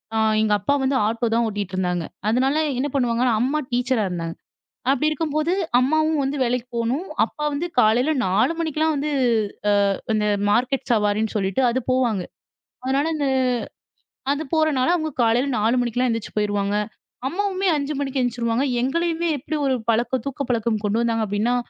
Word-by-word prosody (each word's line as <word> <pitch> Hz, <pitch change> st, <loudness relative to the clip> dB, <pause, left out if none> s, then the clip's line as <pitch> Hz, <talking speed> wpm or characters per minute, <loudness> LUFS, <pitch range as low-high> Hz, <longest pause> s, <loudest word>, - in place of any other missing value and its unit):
ஆ -, -, +1 dB, 0.2 s
எங்க 215 Hz, -1 st, +2 dB
அப்பா 280 Hz, +9 st, +1 dB
வந்து 265 Hz, +1 st, +1 dB
ஆட்டோ 230 Hz, +2 st, -1 dB
தான் 235 Hz, -, +3 dB
ஓட்டிட்டு 200 Hz, -3 st, -4 dB
இருந்தாங்க. 180 Hz, -2 st, -1 dB, 0.2 s
அதுனால 260 Hz, +5 st, +2 dB, 0.2 s
என்ன 265 Hz, +3 st, 0 dB
பண்ணுவாங்கன்னா, 245 Hz, -2 st, +2 dB
அம்மா 275 Hz, +5 st, +1 dB
டீச்சரா 245 Hz, -3 st, +1 dB
இருந்தாங்க. 165 Hz, -2 st, -4 dB, 0.6 s
அப்டி 300 Hz, +2 st, +1 dB
இருக்கும்போது 310 Hz, +1 st, -1 dB, 0.3 s
அம்மாவும் 310 Hz, +4 st, +2 dB
வந்து 275 Hz, +2 st, -2 dB
வேலைக்கு 250 Hz, 0 st, -1 dB
போணும். 245 Hz, +9 st, -1 dB, 0.2 s
அப்பா 300 Hz, -, -8 dB
வந்து 310 Hz, +5 st, -2 dB
காலையில 245 Hz, +6 st, +4 dB
4 195 Hz, -, +2 dB
மணிக்கெல்லாம் 315 Hz, -1 st, 0 dB
வந்து 295 Hz, +2 st, -2 dB, 0.8 s
ஆ -, -, +1 dB, 0.2 s
இந்த 210 Hz, -1 st, +1 dB, 0.2 s
மார்க்கெட் 255 Hz, +5 st, +1 dB
சவாரின்னு 210 Hz, 0 st, +1 dB
சொல்லிட்டு 195 Hz, +2 st, 0 dB
அது 255 Hz, +2 st, 0 dB
போவாங்க. 240 Hz, -7 st, +1 dB, 0.6 s
அதுனால 270 Hz, +3 st, +1 dB
இந்த 290 Hz, -2 st, -1 dB, 1.1 s
அது 290 Hz, +2 st, -1 dB
போறனால 310 Hz, -3 st, +2 dB
அவங்க 315 Hz, -2 st, -2 dB
காலையில 235 Hz, +4 st, +2 dB
4 225 Hz, +4 st, +2 dB
மணிக்கெலாம் 245 Hz, +1 st, 0 dB
எந்திரிச்சி 230 Hz, -2 st, -3 dB
போயிருவாங்க. 205 Hz, -1 st, 0 dB, 0.5 s
அம்மாவுமே 385 Hz, +4 st, -1 dB
5 285 Hz, +1 st, -2 dB
மணிக்கு 275 Hz, -1 st, -2 dB
எந்திச்சிருவாங்க. 240 Hz, +1 st, 0 dB, 0.2 s
எங்களையுமே 335 Hz, +5 st, 0 dB
எப்டி 300 Hz, +3 st, -5 dB
ஒரு 265 Hz, -1 st, +2 dB
பழக்கம் 235 Hz, +2 st, +1 dB
தூக்க 275 Hz, 0 st, -4 dB
பழக்கம், 230 Hz, -2 st, 0 dB
கொண்டு 210 Hz, +2 st, +1 dB
வந்தாங்க 225 Hz, -1 st, 0 dB
அப்டின்னா 210 Hz, +5 st, 0 dB
250 Hz, 155 wpm, -22 LUFS, 220-285 Hz, 1.1 s, காலையில